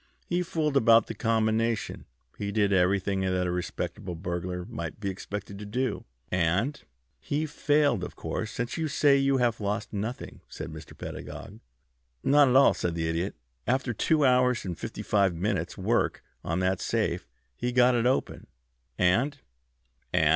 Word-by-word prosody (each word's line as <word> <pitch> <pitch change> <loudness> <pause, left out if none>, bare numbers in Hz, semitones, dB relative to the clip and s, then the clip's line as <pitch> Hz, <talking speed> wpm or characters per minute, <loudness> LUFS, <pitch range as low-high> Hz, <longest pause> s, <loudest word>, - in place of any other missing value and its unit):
He 175 +1 0
fooled 155 -4 -1
about 115 -3 +6
the - - -5
combination. 115 0 0 0.3
He 100 -1 -3
did 100 -1 +2
everything 95 +1 +2
that 95 -1 +1
a 90 - 0
respectable 90 +1 -4
burglar 90 +1 -4
might 85 +2 -6
be 100 -2 -2
expected 100 +1 -6
to 105 - -7
do, 125 +5 -2 0.3
and 95 - +1 0.2
" - - -46
"He 150 +2 +1
failed, 145 -7 +2
of - - -6
course, 110 - -3
since 120 +1 -3
you 160 -1 0
say 145 -1 +4
you 135 0 +3
have 120 -3 +1
lost 105 +2 -2
nothing," 110 +4 -5
said - - -7
Mr. - - -11
Pedagog. - - -8 0.6
"Not 145 0 +6
at 125 - +2
all," 135 - +7
said 85 -1 -2
the 80 -1 -1
Idiot. 85 +4 -1 0.3
"After 130 -1 +1
two 150 +6 +2
hours 125 -2 +3
and 90 -2 -3
fifty - - -6
five 100 -4 +2
minutes' 90 -1 -2
work 105 +5 0 0.2
on 85 +3 -1
that 95 0 +1
safe - - -1 0.3
he 125 - -2
got 125 0 +5
it 120 0 +2
open. 130 - -1 0.5
And 120 +11 +2 0.4
" - - -44
"And?" 80 - +3
105 Hz, 170 wpm, -28 LUFS, 90-125 Hz, 0.6 s, all